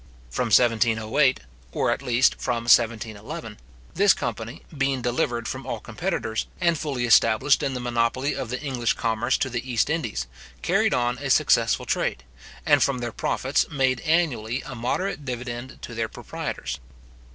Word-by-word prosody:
From 125 - -1
1708, 115 +3 +3 0.3
or - - +1
at - - -1
least 125 -1 +3
from 120 -2 -1
1711, 115 - +1 0.3
this 200 +2 +5
company, 115 +5 -5
being 135 -2 0
delivered 120 -2 -1
from - - -5
all - - -3
competitors, 110 0 -3
and 170 -2 +3
fully 140 -5 -2
established 115 +4 +4
in 135 -2 -1
the - - -2
monopoly 120 +3 0
of 125 - -4
the 125 - -3
English 125 -5 0
commerce 115 0 0
to - - 0
the 125 0 -4
East 120 +5 +1
Indies, 65 - -2 0.4
carried - - +2
on 120 0 0
a 140 0 -4
successful - - +3
trade, - - -1 0.4
and - - +5
from 140 -2 +2
their 120 -1 -4
profits, 135 +2 0
made 130 -4 +1
annually 140 -8 0
a 135 - -8
moderate 135 +8 -2
dividend 125 -1 -6
to 120 - -7
their 115 -1 -2
proprietors. - - -5
125 Hz, 155 wpm, -25 LUFS, 115-135 Hz, 0.4 s, this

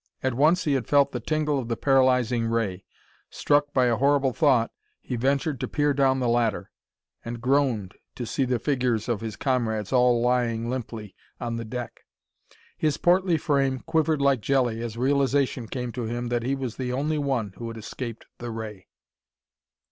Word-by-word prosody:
At 130 -1 +1
once 155 +8 +3
he 150 -4 +1
had 130 -5 -1
felt 140 -1 +4
the - - -3
tingle 150 -2 0
of 120 - -5
the 115 -1 -2
paralyzing 125 -4 +3
ray. 105 -5 -1 0.4
Struck 145 0 +1
by 130 -3 +3
a 120 -2 +2
horrible 140 -1 +2
thought, 130 -7 +3 0.3
he 125 - -5
ventured 135 +3 0
to - - -2
peer 145 -1 +1
down 135 -1 +2
the 125 - 0
ladder 115 -2 0 0.5
and 120 0 -5
groaned 125 -6 +1 0.2
to 120 - -4
see 135 - -1
the 125 -1 +1
figures 125 -3 0
of 115 -4 -1
his 110 -3 -5
comrades, 115 -5 -1
all 125 -1 +4
lying 120 -1 0
limply 115 -5 -5 0.3
on 115 -1 -3
the 115 - -5
deck. 120 +1 -6 0.8
His 155 -2 0
portly 180 -1 +3
frame 135 -4 0
quivered 160 -2 +1
like 135 -4 +3
jelly 125 -3 +1
as 115 -1 -5
realization 135 -1 +1
came 125 +1 -4
to 120 0 -4
him 120 +1 -3
that 120 -1 0
he 130 +4 -1
was 130 -4 -5
the 125 -1 -3
only 150 +4 -1
one 130 -8 -1
who 115 - -6
had 115 0 -7
escaped 115 +1 -7
the 120 - -5
ray. 110 -6 -7
125 Hz, 180 wpm, -25 LUFS, 115-140 Hz, 0.8 s, felt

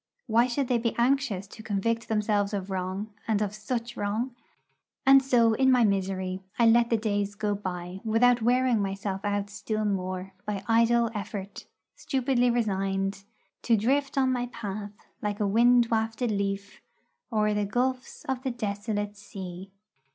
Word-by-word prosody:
Why 235 +1 +3
should 255 +2 -1
they 245 -1 +2
be 230 0 -1
anxious 240 -5 +1
to 215 +3 -12
convict 225 +2 -1
themselves 210 -1 +1
of 195 0 -4
wrong, 190 +3 -3
and 220 -2 +2
of 210 -1 -1
such 235 +2 -4
wrong? 225 +5 -2 0.7
And 270 0 +8
so 240 -4 +4
in 265 +3 +4
my 250 -2 +5
misery 190 -2 0 0.2
I 235 - +4
let 235 +1 +5
the 230 - +3
days 205 -2 -1
go 205 0 -1
by 185 -2 -5
without 240 +2 +3
wearing 245 -1 +3
myself 195 0 -3
out 205 0 -1
still 215 +1 -2
more 185 -1 -2
by 200 -2 -4
idle 230 0 +3
effort, 200 -1 -6 0.3
stupidly 255 -2 +1
resigned 195 -3 -1 0.4
To 230 -2 +3
drift 275 +6 0
on 260 -1 +3
my 245 -1 -1
path, 210 -3 -6 0.3
like 205 -1 -2
a 210 - +1
wind 235 +3 +4
wafted 225 +1 0
leaf, 200 0 -3 0.5
O'er 210 -1 +2
the 210 0 0
gulfs 255 +4 -2
of 265 -2 -2
the 265 - -2
desolate 205 -2 -3
sea. 190 -2 -8
215 Hz, 160 wpm, -27 LUFS, 200-240 Hz, 0.7 s, And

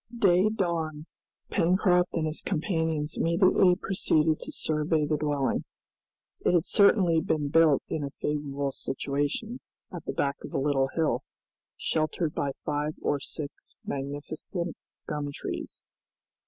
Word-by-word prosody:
Day 190 -2 +4
dawned; 165 -7 -2 0.5
Pencroft 180 0 +3
and 160 - 0
his 155 0 -2
companions 160 -4 -1
immediately 180 +1 +4
proceeded 160 -5 +1
to - - -7
survey 155 0 +1
the 150 +1 +1
dwelling. 145 -2 0 0.8
It - - +2
had 170 0 +3
certainly 190 -6 +4
been 150 -2 0
built 155 -2 +5
in 155 - -2
a 140 - -3
favorable 140 -1 -2
situation, 145 - -2 0.3
at 175 - -7
the - - -3
back 140 0 0
of - - -8
a - - 0
little 135 -1 +2
hill, 160 -2 +1 0.6
sheltered 155 0 0
by 140 -1 -1
five 150 +1 -1
or 145 - 0
six 140 +1 -6
magnificent 145 +5 -4 0.3
gum 150 -1 -3
trees. - - -6
155 Hz, 130 wpm, -28 LUFS, 145-175 Hz, 0.8 s, built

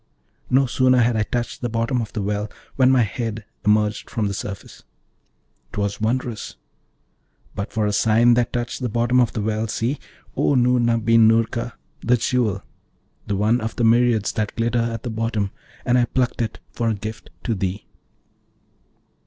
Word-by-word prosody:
no 135 +2 +4
sooner 130 0 +3
had 120 -1 +3
I 110 - +1
touched 120 +2 -3
the 120 - -1
bottom 115 +2 0
of 110 - -5
the 105 - -3
well 105 +1 -2 0.3
when 130 -1 +5
my 130 -2 +5
head 110 0 -4 0.2
emerged 105 0 +1
from 110 - -1
the 100 - -2
surface: 100 0 -7 0.9
'twas 100 0 -2
wondrous! 120 0 -2 1.0
But 100 +1 -4
for 110 -2 0
a 105 - 0
sign 115 +3 +4
that 120 0 +1
touched 120 +2 -3
the 125 - -1
bottom 120 +3 +2
of 120 -3 +2
the 105 - -2
well, 110 +1 -1
see, 120 +6 -1 0.4
O 145 - +2
Noorna 120 -2 +3
bin 115 0 +5
Noorka, 115 +1 +1 0.3
the 125 +1 +2
Jewel, 115 -5 0 0.6
the 105 - 0
one 110 +5 +2
of 110 +2 -4
myriads 115 -2 +3
that 105 -2 -2
glitter 120 +1 +1
at 115 -1 -3
the 120 - -3
bottom, 110 -3 -1 0.3
and 125 +1 +3
I 120 - +3
plucked 125 0 -1
it 115 - -3
for 115 -2 -1
a 110 - 0
gift 105 +1 -7
to 115 - 0
thee.' 95 0 -3
115 Hz, 170 wpm, -22 LUFS, 105-120 Hz, 1.0 s, when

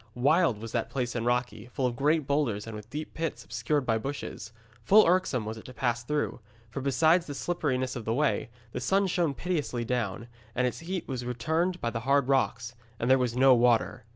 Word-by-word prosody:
Wild 140 - +3
was 115 0 -7
that 115 -1 -1
place 125 -3 -2
and 120 -1 -2
rocky, 120 -2 -1
full 130 +1 -2
of 120 -1 0
great 150 +4 +2
boulders 135 -8 0
and 115 -1 -7
with 105 +1 -9
deep 150 +4 -6
pits 165 -1 -4
obscured 120 +5 -1
by 115 -2 +1
bushes. 115 -3 -6 0.3
Full 210 - +7
irksome 170 -10 +2
was 110 +1 -5
it - - -15
to 130 - -11
pass 120 -2 0
through, 150 +2 -2 0.3
for 135 - -4
besides 160 +6 +3
the 145 - -5
slipperiness 130 -7 -1
of 120 - -5
the 115 - 0
way, 145 -3 +1 0.2
the 125 - -4
sun 195 +11 +2
shone 170 -6 0
pitilessly 145 -6 -2
down, 115 -2 -2 0.3
and 125 - +2
its 125 - -2
heat 180 +2 -4
was 130 -3 -4
returned 160 +9 -1
by 115 - -1
the 115 - -3
hard 140 +2 +2
rocks. 120 -3 +1 0.3
And 120 +2 +1
there 130 - +6
was 125 -1 -1
no 130 0 +7
water. 120 -1 +2
125 Hz, 210 wpm, -28 LUFS, 115-150 Hz, 0.3 s, Full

